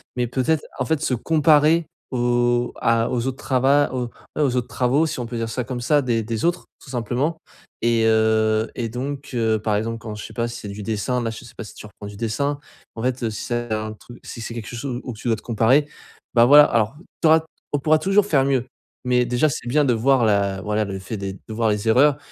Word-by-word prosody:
mais 125 -1 0
peut-être, 140 +6 0 0.2
en 125 - 0
fait, 160 0 0
se 135 - 0
comparer 155 +4 +3 0.2
aux 120 0 +1
à 115 0 +2
aux 120 -1 -1
autres 130 0 -3
trava 135 +2 +2
aux, 125 -2 -2 0.3
et - - +1
aux 130 -4 +2
autres 125 - -1
travaux 130 +6 +1
si 155 -4 -4
on - - -4
peut 115 0 -5
dire 115 0 -2
ça 125 +3 -2
comme 125 0 -5
ça 145 +4 +3
des 115 -4 0
des 110 0 -3
autres 175 +1 0 0.2
tout - - -13
simplement 130 +6 -1 0.4
et 115 -1 +2
heu, 110 0 +2
et 115 -2 -3
donc 140 +5 -5
heu, 110 -2 +1
par 105 0 0
exemple, 115 +2 -2
quand 110 0 -7
je 105 - -7
sais 110 - -11
pas 115 +1 -1
si 120 +1 -7
c'est 105 - -8
du 100 +1 -7
dessin 115 +4 -1
là, 115 - -1
je 110 - -10
sais 120 - -14
pas - - -5
si 105 - -11
tu - - -10
reprends 105 0 -11
du 105 - -9
dessin, 140 +6 -1 0.4
mais - - -8
en - - -5
fait, 130 -1 -1
heu, 115 - +1
si 105 - -6
c'est 120 -1 -3
un 110 0 -3
truc 120 +3 -14
si 115 - -8
c'est 115 - -5
quelque 115 -2 -6
chose 125 +1 -4
où 125 - -5
tu 110 +3 -8
dois 115 - +3
te - - -13
comparer, 125 +6 +2 0.5
bah, 120 0 +7
voilà. 145 +3 +9
Alors 115 +1 +1 0.3
tu 165 - +4
auras 160 +1 +7
t 160 - -19 0.3
on 145 - +2
pourra 155 +2 +3
toujours 195 +4 +3
faire 140 -9 +3
mieux 130 -3 +1 0.4
mais 125 0 +2
déjà, 125 +5 +2
c'est 125 - -5
bien 145 +4 +3
de 125 - +3
voir 130 +1 +3
la 100 -2 +1
voilà 105 +1 -1
le 95 -1 -5
fait 100 +3 -6
des 95 -1 -4
de 105 +3 -11
voir 110 0 +1
les 105 +2 -2
erreurs 135 +5 +5
120 Hz, 255 wpm, -22 LUFS, 110-135 Hz, 0.5 s, voilà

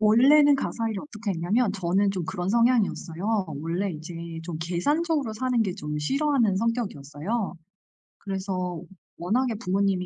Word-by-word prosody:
원래는 275 +7 +6
가사 230 -4 -2
일을 200 - -3
어떻게 215 -7 -5
했냐면 195 +6 +1
저는 195 +1 +1
좀 185 -4 -3
그런 190 0 -3
성향이었어요. 215 -4 +1 0.2
원래 175 +5 -1
이제 160 +2 -8 0.3
좀 170 -2 -4
계산적으로 280 - 0
사는 245 0 +1
게 185 -4 -2
좀 150 -2 -4
싫어하는 260 - +2
성격이었어요. 200 - -2 0.7
그래서 185 -3 -3 0.4
워낙에 230 +7 0
부모님이 195 -3 0
200 Hz, 345 characters per minute, -26 LUFS, 180-235 Hz, 0.7 s, 원래는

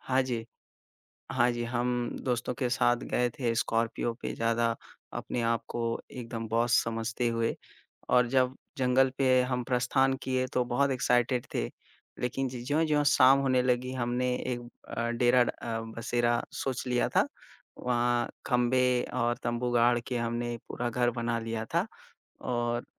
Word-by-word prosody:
हाँ 130 0 +1
जी। 120 -3 -3 0.9
हाँ 120 +1 +3
जी, 120 0 -3
हम 120 0 -1 0.2
दोस्तों 125 -1 -1
के 125 -3 +1
साथ 120 -1 +3
गए 125 0 +2
थे 115 -2 -1
स्कॉर्पियो 115 0 0
पे - - -2
ज़्यादा 115 0 +1 0.4
अपने 120 - -3
आप 115 0 +1
को 120 - -3 0.3
एकदम 115 -2 -5
बॉस 115 +2 +2
समझते 115 +1 -2
हुए 115 0 0 0.6
और 125 -1 +5
जब 130 0 +2 0.2
जंगल 130 +1 +3
पे 130 -1 +4
हम 125 -1 -1
प्रस्थान 130 +2 +2
किए 130 -1 0
तो 125 - +2
बहुत 130 +3 +1
एक्साइटेड 125 -1 +1
थे। - - 0 0.5
लेक़िन 130 +2 -1
ज 125 -1 -6
ज्यों-ज्यों 150 0 +2
शाम 135 -1 +6
होने 130 -2 +2
लगी 125 0 0
हमने 125 0 0
एक 120 -1 -3 0.3
अ, 115 0 -2
डेरा 120 +1 +4
ड - - -1
अ, 115 -1 -4 0.2
बसेरा 120 0 +1
सोच 130 -1 -3
लिया 125 -1 +1
था। - - +5 0.5
वहाँ 120 -1 +1 0.2
खंबे 125 +1 +3 0.3
और 120 -1 +1
तम्बू 120 +1 -1
गाड़ 120 0 +4
के 125 - -2
हमने 120 0 -2
पूरा 120 0 -2
घर 120 0 +2
बना 115 -1 -1
लिया 115 -1 -3
था 175 +5 +2 0.6
और 120 -1 -1
120 Hz, 155 wpm, -29 LUFS, 120-125 Hz, 0.9 s, शाम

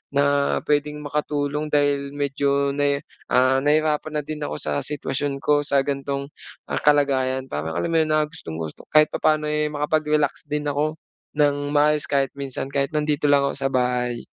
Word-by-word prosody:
na 140 0 +2
pwedeng 150 0 0
makatulong 150 0 -2
dahil 145 -1 +1
medyo 140 0 0
ne 140 0 0 0.3
ah, 130 +1 +4
nahihirapan 155 +1 +1
na 150 - -5
din 155 +1 -6
ako 75 - -3
sa 75 -1 -1
sitwasyon 140 -1 -3
ko 145 0 +4
sa 140 -1 +2
ganitong, 140 0 -3 0.4
ah, - - 0
kalagayan. 135 -3 +2
Parang 80 +2 -3
alam 170 - -1
mo 165 - +2
'yon, 155 -1 +1
na 155 - +3
gustong-gusto 80 - -7
kahit 155 0 +6
papaano, 155 -1 +1
eh, 150 0 +1
makapag-relax 150 0 0
din 150 0 -2
ako 150 +2 -1 0.4
nang 145 -1 +1
maayos 150 0 +3
kahit 135 -2 +1
minsan, 135 -1 -5
kahit 140 +2 -1
nandito 150 -1 0
lang 140 -1 +4
ako - - -5
sa 135 0 0
bahay. 125 -1 0
145 Hz, 165 wpm, -23 LUFS, 140-150 Hz, 0.4 s, kahit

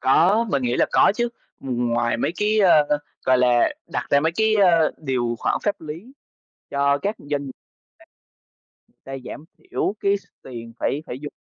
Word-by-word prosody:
Có, 190 - +4
mình 140 -5 0
nghĩ 120 0 0
là - - +4
có - - +5
chứ, 240 0 0 0.3
ừm, 125 -2 -2
ngoài 120 0 0
mấy 140 - 0
cái, 215 +1 +2
ơ, 150 -6 +4 0.3
gọi 130 -1 +4
là, 125 -1 +3
đặt - - -3
ra 140 - +5
mấy 160 +2 +1
cái, 220 0 +2
ơ, 170 -6 +4
điều 125 -5 -1
khoản - - 0
pháp 205 -4 -1
lý 165 - -9 0.6
cho 140 0 +2
các 205 +2 -1
doanh 145 -1 -4
ta, - - -19 1.3
ta 135 - -9
giảm 150 - -8
thiểu 375 - -2
cái 200 0 +2
s 200 - -13 0.2
tiền 115 -2 -9
phải 145 +3 -1
phải 125 - -6
dùng 145 - -7
145 Hz, 185 wpm, -22 LUFS, 130-200 Hz, 1.3 s, có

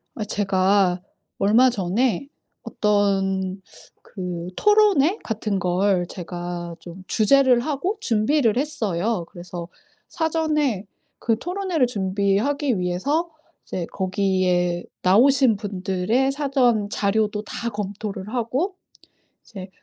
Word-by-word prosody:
아 215 - -3
제가 195 -2 +2 0.4
얼마 225 +6 +5
전에 220 +3 0 0.4
어떤 195 -2 0 0.4
그 180 -3 -6
토론회 415 -4 +4
같은 215 -3 -2
걸 180 0 +1
제가 175 -1 -6
좀 175 +2 -11
주재를 255 +2 +4
하고 310 - -2
준비를 230 +1 +2
했어요. 220 - -1
그래서 175 -1 -8 0.4
사전에 305 - 0 0.3
그 225 -1 +1
토론회를 355 - 0
준비하기 205 +5 0
위해서 275 - -1 0.3
이제 175 -2 -4
거기에 185 -2 0 0.2
나오신 240 +4 +5
분들의 200 +6 0
사전 260 -7 +1
자료도 210 +1 0
다 235 +2 -4
검토를 205 -1 -5
하고 260 - -1 0.7
이제 190 -4 -10
210 Hz, 220 characters per minute, -23 LUFS, 185-265 Hz, 0.7 s, 얼마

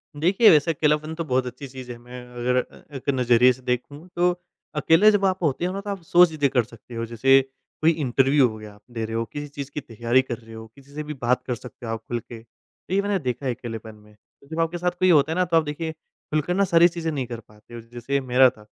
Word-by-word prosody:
देखिए, 185 +9 +5
वैसे 155 +1 +5
अकेलापन 155 0 0
तो 165 - -3
बहुत 130 -3 0
अच्छी 125 +3 -8
चीज़ 130 -1 -9
है। 120 - -8
मैं, 125 +1 -11
अगर 125 +1 0 0.4
एक 135 - -5
नज़रिए 125 0 +4
से 130 - -16
देखूँ 130 +6 -4
तो 175 +1 +3 0.4
अकेले 165 +7 +5
जब 205 -2 +1
आप 185 -1 0
होते 150 +2 0
हो 180 - -2
ना 195 - -4
तो 205 - -7
आप 200 -2 -4
सौ 175 +2 +6
चीज़ें 155 -4 0
कर 125 -2 +2
सकते 115 +1 -14
हो। 115 0 -3
जैसे 135 +4 +4 0.4
कोई 160 +1 +5
इंटरव्यू 135 -2 +3
हो 110 - -8
गया 105 -1 -11
आप 105 - -20
दे 115 -2 -3
रहे 110 +1 -5
हो, 115 0 -1
किसी 145 +5 -7
चीज़ 140 -1 -8
की - - -4
तैयारी 120 +1 +1
कर 125 -3 -5
रहे 115 -1 -15
हो, 110 0 -9
किसी 140 0 -18
से 150 - -3
भी 150 0 -6
बात 125 -1 0
कर 125 - -1
सकते 120 0 -11
हो 115 - -4
आप 115 - -5
खुल 120 - -2
के, 115 0 -11
तो 115 +9 -13
ये 200 - +3
मैंने 200 -1 0
देखा 130 -2 -4
है 125 - 0
अकेलेपन 115 -2 -8
में। 105 0 -20 0.4
जब 160 - -4
आपके 165 +1 0
साथ 180 +1 0
कोई 185 - +4
होता 155 -2 +4
है - - -1
ना 180 - +3
तो 170 -1 +2
आप 160 - +3
देखिए 155 +2 -4
खुलकर 155 +1 -4
ना 200 +2 +2
सारी 170 -1 +6
चीज़ें 170 -2 -3
नहीं 140 -4 -2
कर 120 -1 -6
पाते 105 +1 -19
हो, 120 - -7
जैसे 120 +4 -3
मेरा 130 0 +5
था 110 -4 -17
135 Hz, 260 wpm, -24 LUFS, 120-160 Hz, 0.4 s, सौ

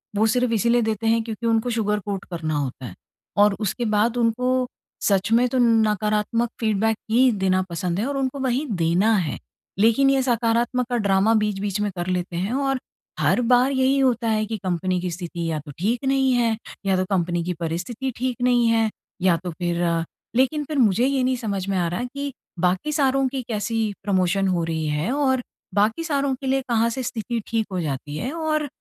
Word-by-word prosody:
वो 215 - +3
सिर्फ़ 250 +1 +1
इसीलिए 235 +2 +3
देते 220 0 -1
हैं 225 0 +3
क्योंकि 225 0 -6
उनको 225 +1 +1
सुगर 210 -2 0
कोट 200 -2 -4
करना 160 -3 -2
होता 130 -2 -4
है, - - -7 0.4
और 205 0 +5
उसके 220 +4 -2
बाद 225 +3 +2
उनको 250 +2 +1 0.4
सच 200 +2 +2
में 240 +2 +4
तो 260 - -1
नकारात्मक 220 0 +2
फीडबैक 220 0 +1
ही 250 +2 +5
देना 190 -2 +1
पसंद 170 +2 -2
है 225 - 0
और 280 0 -2
उनको 270 +1 -2
वही 260 +2 0 0.2
देना 180 +7 +3
है। 170 -6 -2 0.4
लेकिन 230 +6 +4
ये 270 -1 +3
सकारात्मक 240 0 +1
का 245 - 0
ड्रामा 200 +1 +3
बीच-बीच 205 -2 -1
में 205 - 0
कर 175 0 -3
लेते 180 -1 -2
हैं 190 +7 -1
और 270 -1 0 0.4
हर - - +2
बार 250 +3 +4
यही 265 +1 +2
होता 240 -3 +2
है 215 -1 +1
कि 220 +1 -4
कंपनी 185 -1 -1
की 180 - -2
स्थिति 170 -1 -5
या 155 - -1
तो 145 0 -10
ठीक 230 +8 0
नहीं 270 -1 +3
है 230 -2 +2 0.3
या 195 -1 +2
तो 185 - 0
कंपनी 175 -1 0
की 180 - -2
परिस्थिति 180 +11 -3
ठीक 250 -1 -2
नहीं 245 -1 +3
है, 225 -1 +3 0.3
या 180 -3 +4
तो 180 - -3
फिर 175 +1 -2 0.5
लेकिन 265 +4 +2
फिर 300 -1 -4
मुझे 230 +1 +4
ये 270 -1 +1
नहीं 255 0 +2
समझ 200 -5 -3
में 195 - 0
आ 175 -1 +1
रहा 180 +8 -2
कि 280 0 -4 0.3
बाकी 185 - +1
सारों 270 -3 +2
की 265 0 -3
कैसी 220 -1 -1
प्रमोशन 195 0 +1
हो 180 -3 +1
रही 160 -1 -2
है 150 +9 -1
और 265 -3 +1 0.3
बाकी 215 - +2
सारों 280 -4 0
के 265 +1 -7
लिए 270 +1 +2
कहाँ 230 -1 +2
से 260 +3 -3
स्थिति 235 0 -3
ठीक 225 -2 0
हो 185 - -2
जाती 145 -1 -4
है 250 - -3
और 310 -2 -1
225 Hz, 200 wpm, -23 LUFS, 185-250 Hz, 0.5 s, और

